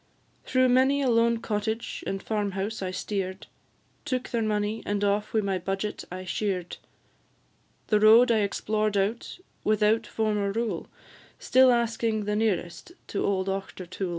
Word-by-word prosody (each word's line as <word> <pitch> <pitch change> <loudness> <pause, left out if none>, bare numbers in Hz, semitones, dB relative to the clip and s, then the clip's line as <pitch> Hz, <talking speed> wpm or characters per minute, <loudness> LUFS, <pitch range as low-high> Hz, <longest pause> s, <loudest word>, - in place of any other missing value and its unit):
Through 255 0 +3
many 265 +3 +3
a 260 - +2
lone 230 0 +3
cottage 220 +1 -3
and 195 0 -3
farm 205 -3 -2
house 200 +3 -3
I 185 - -2
steer'd, 190 0 -4 0.6
Took 255 -3 -3
their 235 - -1
money, 215 0 -1
and 205 0 -2
off 205 +1 0
with 220 -1 +1
my 195 -2 -1
budget 195 +3 -3
I 185 +1 -6
sheer'd; 185 -3 -2 1.1
The 210 -1 +4
road 225 +3 +7
I 225 - +3
explored 210 +1 0
out, 205 +4 -2 0.3
without 215 +1 +2
form 215 -2 -1
or 200 -1 0
rule, 220 -6 -2 0.5
Still 260 0 +5
asking 225 -2 0
the 210 0 -1
nearest 210 - -2 0.2
to 200 - -2
old 190 -1 0
Auchtertool. 190 -1 -4
210 Hz, 150 wpm, -27 LUFS, 195-230 Hz, 1.1 s, road